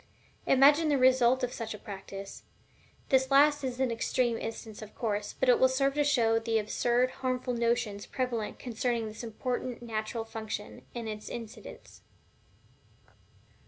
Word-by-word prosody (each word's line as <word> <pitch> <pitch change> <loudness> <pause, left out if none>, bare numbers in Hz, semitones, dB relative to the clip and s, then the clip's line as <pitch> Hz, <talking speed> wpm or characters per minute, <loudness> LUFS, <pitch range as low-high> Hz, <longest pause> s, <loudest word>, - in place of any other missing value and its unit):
Imagine 290 +4 +6
the 290 - +3
result 255 0 +4
of 250 0 -1
such 225 -2 -5
a - - -8
practice! 195 -1 -8 0.7
This 265 0 +3
last 290 +1 +5
is 255 -1 -3
an 260 -2 +1
extreme 235 +1 0
instance, 225 -1 -6
of 215 -1 -10
course, 205 -3 -2
but 265 - +1
it 250 - +5
will 260 - +5
serve 275 +1 +1
to 295 +1 +2
show 235 -6 +3
the 225 0 0
absurd 240 +3 +1
and 255 - 0
harmful 255 -1 -1
notions 235 -3 -1
prevalent 245 -5 -3
concerning 235 -1 -2
this 215 +2 -8
important 245 +1 -4
natural 225 0 -3
function, 220 -2 -6
and 235 -2 -4
its 215 -1 -6
incidents. 230 -2 -9
235 Hz, 155 wpm, -30 LUFS, 220-260 Hz, 0.7 s, Imagine